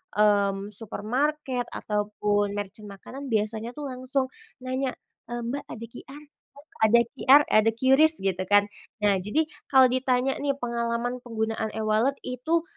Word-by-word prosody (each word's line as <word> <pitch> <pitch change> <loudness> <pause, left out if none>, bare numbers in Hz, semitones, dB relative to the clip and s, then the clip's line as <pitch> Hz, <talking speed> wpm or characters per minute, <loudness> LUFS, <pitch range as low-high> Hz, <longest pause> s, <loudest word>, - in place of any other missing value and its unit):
mmm, 200 -1 +2
supermarket 245 +5 -2
ataupun 205 -1 -1
merchant 205 +1 -6
makanan, 265 +8 -9
biasanya 220 +2 -1
tuh 295 - -5
langsung 255 +1 -1 0.4
nanya, 260 +1 -1 0.4
"Eee, 240 0 -3
Mbak 255 +5 -3
ada 230 +1 -7
QR? 280 +4 -11 0.3
Mas, 285 +2 -16 0.2
ada 235 +2 +6 0.2
QR, 275 +2 +7
eh, - - +6
ada 225 - +3
QRIS?" 270 +6 +5
Gitu 185 -1 0
kan. 205 +1 +5 0.4
Nah, 205 -1 +4
jadi 295 +12 0 0.2
kalau 265 -1 +7
ditanya 255 +1 +1
nih 280 -1 0
pengalaman 235 0 -2
penggunaan 220 -2 -2
e-wallet 220 +5 +1
itu 285 +7 -1
235 Hz, 140 wpm, -26 LUFS, 210-265 Hz, 0.4 s, QR